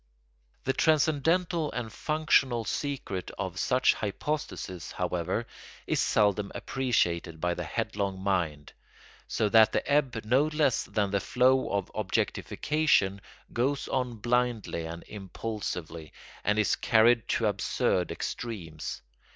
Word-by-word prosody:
The 135 - +1
transcendental 160 +3 +2
and 115 -3 -4
functional 140 -6 +2
secret 125 -9 -3
of 95 -2 -4
such 130 -1 +3
hypostases, 105 - -4
however, 90 +5 -1 0.4
is - - 0
seldom 105 -1 +2
appreciated 85 -11 0
by 90 +2 0
the - - -4
headlong 100 -2 -2
mind; 85 -7 -1 0.5
so 110 - 0
that 110 +1 +6
the - - 0
ebb 135 -5 +1
no 130 +6 +4
less 150 -5 +1
than 100 -2 -1
the 100 - +2
flow 130 +4 +3
of 100 -2 -1
objectification 110 +1 +1 0.3
goes 135 +4 0
on 125 -2 -1
blindly 120 -7 0
and 85 +1 -7
impulsively, 95 -6 -6 0.3
and 105 0 +1
is 110 - +3
carried 115 +1 +4
to 115 - +1
absurd 95 -3 +1
extremes. 90 -10 -5
110 Hz, 120 wpm, -29 LUFS, 95-130 Hz, 0.5 s, that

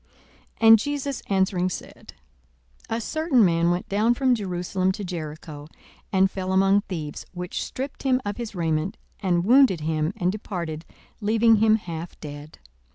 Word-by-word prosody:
42:010:030 225 - +5
And 225 0 +9
Jesus 285 +1 -3
answering 190 -2 +1
said, - - -9 0.8
A 225 - -1
certain 280 -2 +2
man 170 -1 +2
went 180 +6 -1
down 215 +4 +2
from 260 -1 +2
Jerusalem 185 -3 -1
to 205 - -6
Jericho, 155 -4 -7 0.4
and 190 0 +3
fell 185 -1 -3
among 195 +1 +4
thieves, 155 -7 -6
which 180 0 -4
stripped 265 +2 -6
him 260 -2 +2
of 205 0 -3
his 235 -4 -6
raiment, 165 +1 -1 0.2
and 175 -3 +1
wounded 240 - +5
him, 155 +1 0
and 180 0 +1
departed, 170 -6 -5 0.4
leaving 225 +2 +4
him 215 +1 +4
half 170 -5 -6
dead. 145 0 -9
190 Hz, 155 wpm, -24 LUFS, 170-225 Hz, 0.8 s, And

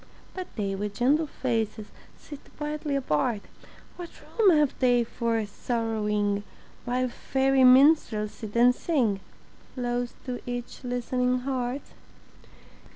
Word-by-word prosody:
But 370 -1 -5
they 200 -3 -2
with 205 +1 -4
gentle 290 +8 +2
faces 225 -5 -2 0.3
Sit 290 -2 -10 0.2
quietly 295 -1 -3
apart; 215 - 0 0.6
What 350 -1 -7
room 435 -4 +2
have 295 -3 +2
they 245 -2 +4
for 230 -1 -1
sorrowing 210 -2 -1 0.4
While 250 +1 0
fairy 265 +2 +1
minstrels 255 -5 +5
sit 215 -2 -9
and 245 +1 +6
sing 250 - 0 0.6
Close 245 -1 -2
to 250 -1 -4
each 245 +2 -6
listening 250 0 0
heart? 260 0 -2
245 Hz, 115 wpm, -27 LUFS, 225-270 Hz, 0.6 s, and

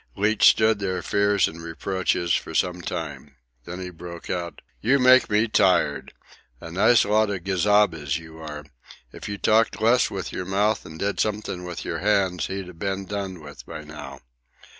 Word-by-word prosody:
Leach 105 +2 +3
stood 110 -1 +3
their 95 -3 -2
fears 100 0 +2
and 80 +1 -9
reproaches 85 0 -1
for - - -2
some 90 -1 0
time. 75 -5 -6 0.3
Then 90 +1 -7
he 90 -1 -6
broke 85 0 -8
out: 85 -2 -4 0.2
"You 130 +5 +3
make 130 -1 +5
me 105 +2 +2
tired! 90 -9 +2 0.5
A 80 - -9
nice 110 +7 +4
lot 105 +1 +2
of 95 -4 -4
gazabas 95 -5 +2
you 80 -1 -12
are! 75 -2 -8 0.5
If - - -8
you 100 - -4
talked 110 +3 +2
less 115 +3 +3
with 95 -2 -5
yer - - -3
mouth 100 +3 0
and 80 - -10
did 100 +4 -2
something 105 -4 -2
with 90 -1 -6
yer - - -3
hands, 95 -4 +1
he'd 95 -1 -5
a - - -10
ben 95 +2 -3
done 95 -3 -5
with 70 -1 -11
by 80 -2 -7
now. 75 0 -10
95 Hz, 180 wpm, -24 LUFS, 85-105 Hz, 0.5 s, make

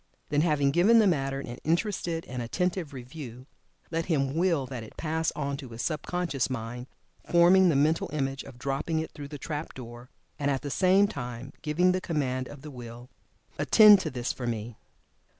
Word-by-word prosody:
Then, 145 0 +2
having 150 -4 +2
given 190 +10 +5
the 220 - +6
matter 135 -7 +1
an 120 -2 -8
interested 170 -1 -1
and 125 -1 -5
attentive 180 +6 -2
review, 125 -1 -9 0.5
let 165 0 -1
him 140 -6 +1
Will 165 -5 +2
that 125 -2 -6
it 110 - -12
pass 160 0 -1
on 140 -1 -2
to 135 -3 -9
his 115 +1 -6
sub 155 -3 -1
conscious 170 -8 -1
mind, 120 0 -5 0.4
forming 180 +2 +6
the 160 - +2
mental 155 +4 +2
image 135 -2 -2
of 135 -3 -12
dropping 140 +5 -2
it 160 - -2
through 145 -2 -8
the 145 0 -7
trap 150 +2 -5
door, 120 0 -10 0.3
and 145 -1 0
at 135 0 -1
the 145 - -4
same 190 +4 +4
time 125 - -6
giving 170 +4 +2
the 185 0 -1
command 130 -7 -1
of 145 -1 -11
the 150 - -8
Will, 120 0 -10 0.5
"Attend 210 -2 +8
to - - -3
this 125 -1 -3
for 125 - -5
me!" 115 0 -4
145 Hz, 190 wpm, -28 LUFS, 125-165 Hz, 0.5 s, Attend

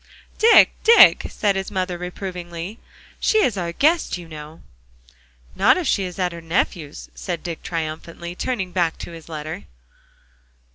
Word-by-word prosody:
"Dick, 455 +1 +7
Dick," 460 +1 +7
said 205 -2 0
his 195 0 -3
mother 185 -2 -2
reprovingly, 180 +1 -7 0.4
"she 435 -1 +3
is 235 - +1
our 175 -3 -3
guest, 305 - +1
you 175 -2 -10
know." 155 0 -11 0.9
"Not 245 +8 +4
if 360 - -2
she 195 -8 +1
is 180 -1 -7
at 180 -2 0
her 170 0 -9
nephew's," 165 -2 -2
said 175 -3 -5
Dick 170 -2 -5
triumphantly, 165 +1 -5
turning 190 -2 -3
back 175 -3 0
to - - -8
his 165 -1 -12
letter. 155 -5 -6
180 Hz, 150 wpm, -22 LUFS, 165-195 Hz, 0.9 s, Dick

